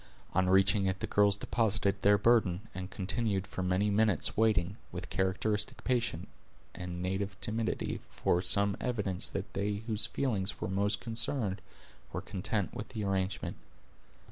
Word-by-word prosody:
On 95 Hz, 0 st, +3 dB
reaching 95 Hz, +1 st, +4 dB
it 95 Hz, 0 st, -1 dB
the -, -, -1 dB
girls 100 Hz, -1 st, +3 dB
deposited 100 Hz, -3 st, +1 dB
their 100 Hz, 0 st, +6 dB
burden, 100 Hz, -4 st, +3 dB
and 95 Hz, 0 st, -5 dB
continued 100 Hz, 0 st, -1 dB
for 95 Hz, -, -5 dB
many 95 Hz, +3 st, +1 dB
minutes 105 Hz, -2 st, +2 dB
waiting, 105 Hz, -3 st, +2 dB
with -, -, -6 dB
characteristic 105 Hz, +6 st, 0 dB
patience, 120 Hz, -2 st, 0 dB, 0.5 s
and 90 Hz, 0 st, -5 dB
native 95 Hz, +2 st, -2 dB
timidity, 110 Hz, 0 st, -1 dB
for 90 Hz, -, +1 dB
some 100 Hz, +2 st, +2 dB
evidence 105 Hz, -7 st, -1 dB
that -, -, -5 dB
they 100 Hz, +1 st, -1 dB
whose 110 Hz, -2 st, 0 dB
feelings 105 Hz, -8 st, -1 dB
were -, -, -2 dB
most 100 Hz, +1 st, 0 dB
concerned 115 Hz, -4 st, 0 dB, 0.5 s
were -, -, -2 dB
content 100 Hz, +1 st, -2 dB
with 105 Hz, -, -5 dB
the 110 Hz, -4 st, -4 dB
arrangement. 95 Hz, -1 st, -1 dB
100 Hz, 145 wpm, -32 LUFS, 95-110 Hz, 0.5 s, their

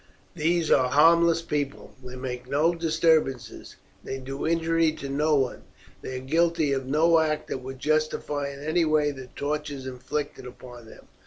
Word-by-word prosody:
These 170 Hz, 0 st, +1 dB
are 130 Hz, -2 st, +4 dB
harmless 165 Hz, +4 st, +5 dB
people. 145 Hz, -3 st, -4 dB
They 125 Hz, 0 st, -8 dB
make 125 Hz, -1 st, -6 dB
no 150 Hz, +5 st, +2 dB
disturbances; 160 Hz, -6 st, 0 dB, 0.3 s
they 135 Hz, -, -5 dB
do 135 Hz, +3 st, -5 dB
injury 165 Hz, -1 st, +2 dB
to 140 Hz, -3 st, -7 dB
no 150 Hz, +3 st, +2 dB
one; 130 Hz, -3 st, 0 dB, 0.4 s
they 130 Hz, -, -6 dB
are 130 Hz, -, -8 dB
guilty 165 Hz, 0 st, +2 dB
of 135 Hz, -1 st, -3 dB
no 160 Hz, +4 st, +4 dB
act 155 Hz, -1 st, -1 dB
that -, -, -3 dB
would 130 Hz, +1 st, -8 dB
justify 150 Hz, 0 st, -1 dB
in 140 Hz, 0 st, -9 dB
any 160 Hz, +3 st, +1 dB
way 155 Hz, -2 st, +2 dB
the 130 Hz, -2 st, -9 dB
tortures 145 Hz, 0 st, -4 dB
inflicted 130 Hz, +1 st, -5 dB
upon 125 Hz, -2 st, -12 dB
them. -, -, -15 dB
150 Hz, 165 wpm, -26 LUFS, 130-160 Hz, 0.4 s, harmless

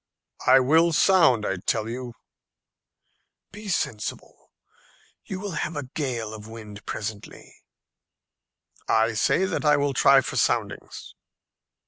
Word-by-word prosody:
"I 130 Hz, +1 st, +7 dB
will 160 Hz, +6 st, +3 dB
sound, 155 Hz, -, +4 dB
I 95 Hz, -, -1 dB
tell 105 Hz, +4 st, -1 dB
you." 120 Hz, 0 st, -6 dB, 1.4 s
"Be 210 Hz, +1 st, -10 dB
sensible; 110 Hz, -, -4 dB, 0.7 s
you 190 Hz, -, -6 dB
will 200 Hz, 0 st, -5 dB
have 155 Hz, 0 st, -3 dB
a 145 Hz, -3 st, -5 dB
gale 120 Hz, -8 st, -3 dB
of 105 Hz, -1 st, -10 dB
wind 105 Hz, -2 st, -10 dB
presently." 105 Hz, -1 st, -7 dB, 1.3 s
"I 110 Hz, +1 st, +2 dB
say 170 Hz, -, +2 dB
that -, -, -3 dB
I 150 Hz, -1 st, +4 dB
will 140 Hz, -1 st, 0 dB
try 135 Hz, 0 st, +5 dB
for -, -, -5 dB
soundings." -, -, -2 dB
130 Hz, 120 wpm, -25 LUFS, 110-160 Hz, 1.4 s, I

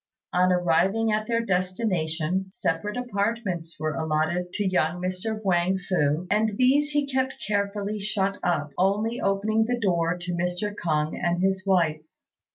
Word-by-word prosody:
On 180 Hz, +1 st, +4 dB
arriving 180 Hz, +6 st, +2 dB
at 215 Hz, 0 st, 0 dB
their 230 Hz, 0 st, 0 dB
destination, 185 Hz, -2 st, 0 dB
separate 210 Hz, 0 st, -2 dB
apartments 200 Hz, -8 st, -2 dB
were 155 Hz, 0 st, -1 dB
allotted 160 Hz, +3 st, -1 dB
to 205 Hz, -2 st, 0 dB
young 180 Hz, -2 st, +1 dB
Mr. 185 Hz, +4 st, -3 dB
Huang 185 Hz, 0 st, +2 dB
fu, 175 Hz, -3 st, 0 dB
and 210 Hz, 0 st, +1 dB
these 280 Hz, +3 st, +4 dB
he 290 Hz, -1 st, +1 dB
kept 260 Hz, -1 st, -1 dB
carefully 205 Hz, 0 st, -1 dB
shut 200 Hz, -1 st, -1 dB
up, 150 Hz, -5 st, 0 dB
only 210 Hz, +6 st, +1 dB
opening 215 Hz, +3 st, +1 dB
the 245 Hz, +1 st, -1 dB
door 175 Hz, -4 st, +1 dB
to 175 Hz, 0 st, -4 dB
Mr. 180 Hz, +4 st, -1 dB
K'ung 155 Hz, -5 st, -1 dB
and 175 Hz, +1 st, +1 dB
his 190 Hz, 0 st, 0 dB
wife. 165 Hz, -5 st, +2 dB
190 Hz, 150 wpm, -26 LUFS, 175-215 Hz, -, On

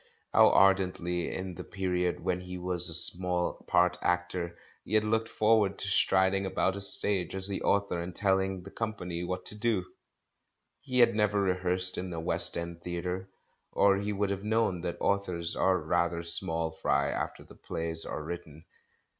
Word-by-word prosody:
How -, -, +7 dB
ardently, 90 Hz, -3 st, +2 dB
in 95 Hz, -1 st, -5 dB
the -, -, -8 dB
period 90 Hz, -2 st, -2 dB
when 90 Hz, +1 st, -1 dB
he 90 Hz, 0 st, -7 dB
was 90 Hz, -1 st, +2 dB
a -, -, -2 dB
small 90 Hz, +1 st, +5 dB
part 90 Hz, 0 st, +3 dB
actor, 90 Hz, -1 st, -2 dB, 0.3 s
he 110 Hz, -, -3 dB
had 110 Hz, -, +4 dB
looked 115 Hz, +1 st, 0 dB
forward 110 Hz, -2 st, +2 dB
to -, -, -3 dB
strid 95 Hz, 0 st, +3 dB
ing 100 Hz, 0 st, 0 dB
about 95 Hz, 0 st, 0 dB
a 100 Hz, -, -5 dB
stage 95 Hz, -2 st, +1 dB
as 95 Hz, 0 st, -4 dB
the 100 Hz, -, -4 dB
author 100 Hz, -4 st, 0 dB
and 85 Hz, +1 st, -7 dB
telling 95 Hz, -2 st, 0 dB
the 100 Hz, -, -11 dB
company 90 Hz, -6 st, -4 dB
what 90 Hz, +1 st, -4 dB
to -, -, -2 dB
do! 105 Hz, -4 st, 0 dB, 0.9 s
He 130 Hz, -2 st, -4 dB
had 120 Hz, -, +5 dB
never 105 Hz, -1 st, +1 dB
rehearsed 90 Hz, -1 st, +1 dB
in 90 Hz, 0 st, -5 dB
a 85 Hz, -, -4 dB
West 80 Hz, -, 0 dB
End 85 Hz, 0 st, -6 dB
theatre, 90 Hz, +2 st, -4 dB, 0.4 s
or 100 Hz, -1 st, +4 dB
he 100 Hz, +1 st, -2 dB
would 100 Hz, -1 st, -1 dB
have 100 Hz, 0 st, -4 dB
known 105 Hz, -5 st, 0 dB
that 85 Hz, -1 st, -4 dB
authors 90 Hz, -4 st, -1 dB
are 95 Hz, -1 st, +2 dB
rather 85 Hz, +1 st, -1 dB
small 80 Hz, -1 st, -2 dB
fry 70 Hz, -3 st, 0 dB
after -, -, -4 dB
the -, -, -16 dB
plays 80 Hz, 0 st, -4 dB
are -, -, -5 dB
written. 80 Hz, -1 st, -8 dB
90 Hz, 180 wpm, -29 LUFS, 85-100 Hz, 0.9 s, How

